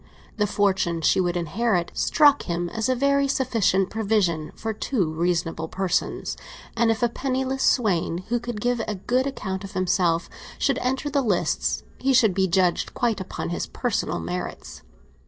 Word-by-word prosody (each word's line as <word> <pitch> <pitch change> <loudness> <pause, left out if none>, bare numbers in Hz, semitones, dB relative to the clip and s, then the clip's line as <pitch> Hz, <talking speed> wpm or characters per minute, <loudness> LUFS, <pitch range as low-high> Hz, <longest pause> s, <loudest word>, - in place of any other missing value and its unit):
The 210 -1 +2
fortune 190 -5 +1
she 160 - +3
would 175 -1 0
inherit 175 +2 0
struck 290 -2 +4
him 175 0 -1
as 220 +6 -2
a 255 - +3
very 280 +2 +2
sufficient 225 -8 +1
provision 195 -8 0
for 225 -1 -3
two 200 - -1
reasonable 165 -1 -1
persons, 190 +1 -1 0.4
and 230 0 +3
if 225 +1 0
a - - +5
penniless 265 +2 -2
swain 185 -9 +1
who 240 0 +1
could 240 -3 -5
give 245 0 +1
a 215 - -2
good 250 +7 0
account 190 -8 -4
of 195 - -8
himself 180 -2 +1 0.3
should - - +1
enter 265 +3 -1
the 280 -1 +2
lists, 205 -8 0 0.2
he 270 0 +2
should 220 -6 +5
be 190 +1 +2
judged 180 -1 +1
quite 230 -5 0
upon 190 - -5
his 170 - -3
personal - - -2
merits. 90 +2 -6
205 Hz, 165 wpm, -24 LUFS, 175-245 Hz, 0.4 s, a